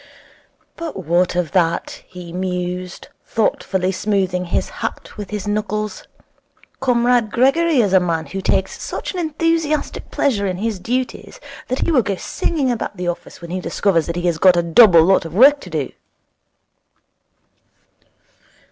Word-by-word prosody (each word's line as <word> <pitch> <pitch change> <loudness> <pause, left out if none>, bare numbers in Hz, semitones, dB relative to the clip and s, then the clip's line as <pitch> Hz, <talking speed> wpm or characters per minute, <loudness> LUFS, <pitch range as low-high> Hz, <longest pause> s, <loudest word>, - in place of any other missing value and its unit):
'But 305 - -6
what 175 +3 +2
of 175 -3 -1
that?' 170 -3 0
he 180 -2 -10
mused, 180 0 -4
thoughtfully 190 -4 0
smoothing 190 -2 -1
his 170 - -1
hat - - -5
with 205 -3 -7
his 210 -1 -4
knuckles. 210 0 -3 0.7
'Comrade 245 -3 +2
Gregory 275 +4 +3
is 200 -4 0
a 190 - +7
man 165 -3 -1
who 190 +7 -5
takes 190 0 -1
such - - -5
an 365 - -4
enthusiastic 320 -1 -1
pleasure 210 -8 0
in 185 -1 -2
his 215 0 -2
duties 250 +6 -3 0.3
that 255 - -2
he - - +1
will 270 -6 +4
go 200 -3 -2
singing 275 - -1
about 220 -3 -4
the 180 0 -3
office 175 0 -5
when 170 0 -8
he 185 - -2
discovers 180 -3 0
that 170 - -3
he 175 0 -3
has 170 -2 0
got 185 0 +6
a 175 - +2
double 170 -1 +7
lot 190 +2 +3
of 165 0 -8
work 280 +6 +7
to 185 - -11
do.' 155 -5 -3
195 Hz, 155 wpm, -19 LUFS, 180-245 Hz, 0.7 s, a